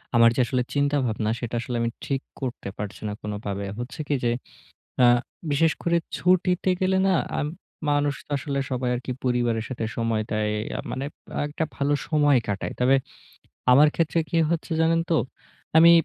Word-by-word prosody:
আমার 115 0 +7
যে - - -1
আসলে 125 0 0
চিন্তাভাবনা 135 -7 +1
সেটা 120 -1 -4
আসলে 125 0 -4
আমি 115 - +1 0.2
ঠিক 135 -1 -1 0.2
করতে 125 -6 -4
পারছি 105 -1 -6
না - - -3
কোনোভাবে। 105 -1 -4
হচ্ছে 125 +5 -6
কি 145 - +1
যে 120 - +2 0.7
আ - - +8 0.5
বিশেষ 160 +3 +4
করে 170 0 +3 0.2
ছুটিতে 180 +1 +2
গেলে 190 0 +3
না 190 - +4 0.2
আম 145 - 0 0.4
মানুষ 145 0 +2
তো - - -15
আসলে 140 -1 -2
সবাই 125 -1 0
একি 125 +1 -5
পরিবারের 120 -3 +1
সাথে 115 -3 -3
সময় 115 -2 0
দেয়। 105 0 0 0.2
আ - - -3
মানে 135 +1 -3 0.4
একটা 150 +2 -2
ভালো 140 +1 +1
সময় 145 -3 +4
কাটায়। 100 -1 -2
তবে 130 +2 +5 0.8
আমার 150 +4 +7
ক্ষেত্রে 165 0 +1
কি 170 - 0
হচ্ছে 170 0 -1
জানেন 165 +1 +3
তো? - - +4 0.6
আমি 170 +1 +9
135 Hz, 170 wpm, -25 LUFS, 115-150 Hz, 0.8 s, আমি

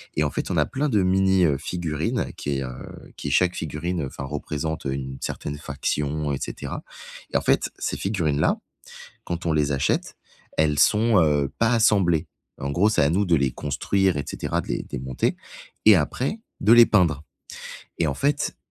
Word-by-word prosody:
et 75 - +2
en 75 - 0
fait, - - -3
on - - -1
a - - +4
plein 145 +2 -1
de 105 -5 +2
mini, 95 0 +3
heu, 70 -4 +2
figurines 80 0 -2
qui, 70 -1 -2
heu, 65 - -5 0.5
qui 70 - -4
chaque 90 +4 +3
figurine, 80 +3 -3
heu, - - -3
enfin 65 - -7
représente 75 +2 -4
une 65 -1 -3
certaine 75 0 -4
faction 75 0 -2
et 70 - -2
cetera - - -5 0.5
et - - +4
en - - -1
fait, - - +2
ces - - -2
figurines-là, 80 -7 0 0.7
quand 85 +1 -4
on 80 - +2
les 75 -2 +1
achète, 70 - 0 0.4
elles 75 -2 +2
sont, 110 +5 +4
heu, 75 -3 +2
pas 115 +1 +3
assemblées. 95 -8 +3 0.3
En 70 - -3
gros, 90 +8 +3
c'est 110 - +2
à 70 - +3
nous 100 +4 +2
de 85 -3 +3
les 70 -3 +1
construire 85 +7 0
et 70 - -3
cetera, - - -2
de - - -13
les - - -2
de - - -17
les - - -2
monter 65 -1 -1 0.5
et 110 - +9
après 125 - -1 0.2
de 105 +3 +6
les 120 0 +9
peindre 85 -8 +2 0.8
et 85 - +2
en 70 - -1
fait, 140 - 0
80 Hz, 195 wpm, -24 LUFS, 70-95 Hz, 0.8 s, et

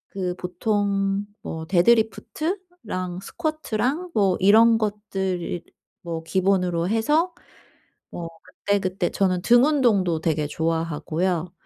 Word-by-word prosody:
그 180 -2 -2
보통 195 +1 -1 0.2
뭐 160 0 -6
데드리프트랑 220 - 0
스쿼트랑 310 - -2
뭐 195 -3 +2
이런 225 +4 +6
것들을 195 -5 -3 0.4
뭐 165 -1 -4
기본으로 180 -1 +1
해서 300 - +1 0.8
뭐 170 -1 -5 0.2
그때그때 190 -3 -1
저는 185 -2 0
등 240 +4 +5
운동도 205 - +2
되게 155 -2 0
좋아하고요. 165 +2 -1
195 Hz, 230 characters per minute, -24 LUFS, 175-225 Hz, 0.8 s, 이런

